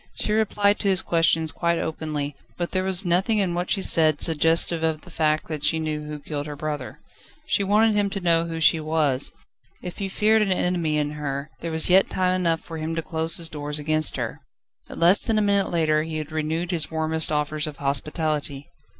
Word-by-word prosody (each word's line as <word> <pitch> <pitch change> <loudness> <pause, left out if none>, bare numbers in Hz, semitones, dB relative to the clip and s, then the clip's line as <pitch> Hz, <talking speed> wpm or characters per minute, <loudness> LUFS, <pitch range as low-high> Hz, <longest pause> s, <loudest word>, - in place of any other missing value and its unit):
She 210 - -1
replied 210 -1 +2
to - - -1
his 190 -2 +3
questions 165 -1 +2
quite 170 -1 0
openly, 150 -3 -3 0.2
but 175 -1 -3
there 185 -1 0
was 190 0 +1
nothing 185 +6 +2
in 190 -4 +1
what 175 +1 -2
she 195 - +1
said, 155 -3 +4
suggestive 165 +1 +2
of 160 -1 -1
the 180 - -14
fact 155 -1 0
that 155 -2 -5
she 150 +2 +3
knew 155 -1 -3
who 150 0 -5
killed 145 0 -5
her 150 - -6
brother. 150 -3 -5 0.5
She 200 - 0
wanted 210 +2 +3
him 205 -1 +1
to 195 - -4
know 170 -2 +2
who 165 -1 -4
she 160 0 +4
was. 155 -4 0 0.5
If 180 - -7
he 195 -1 -3
feared 215 +3 +3
an 205 -2 +1
enemy 175 -4 0
in 150 -1 -1
her, 145 -1 -5
there 170 - -4
was 160 0 +2
yet 190 +2 +5
time 185 -1 +1
enough 170 -3 0
for 165 -1 -8
him 160 +1 -3
to 165 - -2
close 160 0 -1
his 165 - -4
doors 150 -2 -5
against 155 +1 +1
her. - - -4 0.5
But - - -10
less 175 +4 +6
than 225 -2 0
a - - +3
minute 200 -1 +2
later, 155 -3 +2
he 160 0 -4
had 155 0 -5
renewed 160 +3 -2
his 160 -5 -1
warmest 160 0 -1
offers 150 +1 -1
of 150 -2 -7
hospitality. 145 0 -2
160 Hz, 215 wpm, -24 LUFS, 155-180 Hz, 0.5 s, less